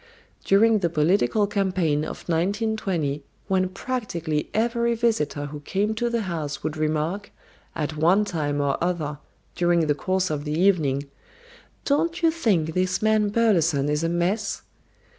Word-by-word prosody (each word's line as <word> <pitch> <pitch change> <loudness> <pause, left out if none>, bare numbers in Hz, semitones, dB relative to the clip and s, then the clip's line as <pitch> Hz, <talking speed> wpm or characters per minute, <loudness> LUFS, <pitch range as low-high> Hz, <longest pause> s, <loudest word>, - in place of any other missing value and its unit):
During 215 +2 +4
the 175 -3 0
political 180 +7 +2
campaign 185 -7 0
of - - -7
1920, 180 -4 -1 0.3
when 185 -1 +1
practically 185 -8 -3
every 235 +1 +1
visitor 220 -11 0
who 145 +1 -7
came 200 +8 -1
to 240 +2 -1
the 235 -1 0
house 160 -7 -4
would 155 0 -2
remark, 155 +6 -2 0.4
at 155 -1 -3
one 180 +7 +4
time 145 -6 -2
or 140 +2 0
other 155 -5 -2 0.3
during 175 -1 +2
the 150 - +2
course 185 +4 -1
of 145 -1 -2
the 150 +1 -2
evening, 155 -8 +2 0.8
"Don't 335 +5 0
you 330 - +5
think 195 - +1
this 185 +3 0
man 215 -1 +3
Burleson 170 -10 +2
is 150 +2 0
a 165 - +1
mess?" 185 +5 -1
180 Hz, 145 wpm, -24 LUFS, 155-210 Hz, 0.8 s, you